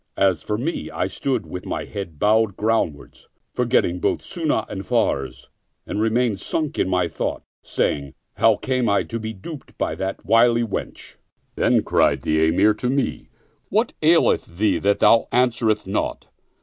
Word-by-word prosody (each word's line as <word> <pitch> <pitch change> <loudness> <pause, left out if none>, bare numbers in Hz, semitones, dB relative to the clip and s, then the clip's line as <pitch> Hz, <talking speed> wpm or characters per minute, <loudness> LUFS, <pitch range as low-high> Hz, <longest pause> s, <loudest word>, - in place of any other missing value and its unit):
As 95 -4 +2
for 105 - -2
me, 150 +9 -3
I - - -2
stood, 125 -8 -2
with 90 +3 -7
my - - -3
head 95 -6 -7
bowed 110 +2 +2
ground 110 -8 +1
wards, - - -17 0.2
forgetting 120 -8 +1
both - - 0
Sunnah - - -1
and - - -5
Farz, 65 -2 -1 0.4
and 105 - -3
remained 115 -2 +1
sunk 155 +5 -2
in 95 - +1 0.2
thought, 80 - -4 0.2
saying, 70 -2 -2 0.2
"How 115 -1 +5
came 130 0 -1
I 100 -2 +2
to 115 - -5
be 110 0 -4
the 110 - -12
dupe 155 - -9
of - - -1
that 95 0 -4
wily 120 +1 +4
wench?" 110 - -6 0.4
Then - - +2
cried - - +2
the 80 0 +2
Emir 95 +6 +4
to 125 +3 -3
me, 135 +1 -2 0.4
"What - - +1
aileth 85 - +3
thee 100 -4 +2
that 100 +4 +1
thou 115 - +5
answerest 115 -3 +1
not?" 95 - -2
110 Hz, 165 wpm, -22 LUFS, 95-120 Hz, 0.4 s, How